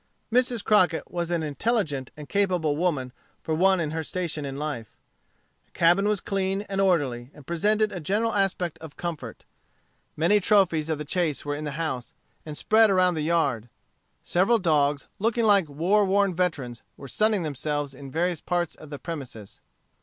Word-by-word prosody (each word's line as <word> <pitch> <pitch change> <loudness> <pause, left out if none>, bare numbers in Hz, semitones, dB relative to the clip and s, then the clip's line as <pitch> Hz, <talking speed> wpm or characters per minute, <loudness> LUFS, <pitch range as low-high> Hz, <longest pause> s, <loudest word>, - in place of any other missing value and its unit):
Mrs. 245 -3 +2
Crockett 185 -6 +2
was 175 -1 -2
an 170 -2 0
intelligent 150 - -1
and 150 -1 -9
capable 180 -6 +1
woman 145 -7 -1 0.3
for 160 - -2
one 190 +3 +3
in 155 -3 -2
her 160 0 -2
station 160 -3 -3
in 135 0 -5
life. 145 -8 -5 0.7
The - - -38
cabin 175 +4 +3
was 210 -2 +1
clean 195 0 -1
and 195 -2 -2
orderly, 140 -10 +1
and 145 - -14
presented 210 +6 +1
a 185 - -5
general 210 +8 0
aspect 185 -4 0
of 160 -2 -11
comfort. 170 -3 -6 0.7
Many 170 +7 +4
trophies 180 -6 +2
of 160 - 0
the 150 - -6
chase 160 -2 -1
were 145 - -2
in 150 +1 -5
the 145 - -4
house, 130 -7 -3 0.3
and 150 -1 -5
spread 220 0 +4
around 185 -2 +3
the 160 - -2
yard. 145 -8 0 0.5
Several 195 +7 +3
dogs, 150 -6 +1
looking 230 +2 +1
like 200 -7 +4
war 180 +9 +2
worn 200 0 +2
veterans, 150 -10 -2 0.2
were 140 - -9
sunning 210 - +1
themselves 145 -1 -3
in 135 +1 -10
various 170 +3 -1
parts 175 -2 -1
of 155 - -13
the 145 - -6
premises. 135 - -8
170 Hz, 175 wpm, -26 LUFS, 145-195 Hz, 0.7 s, Many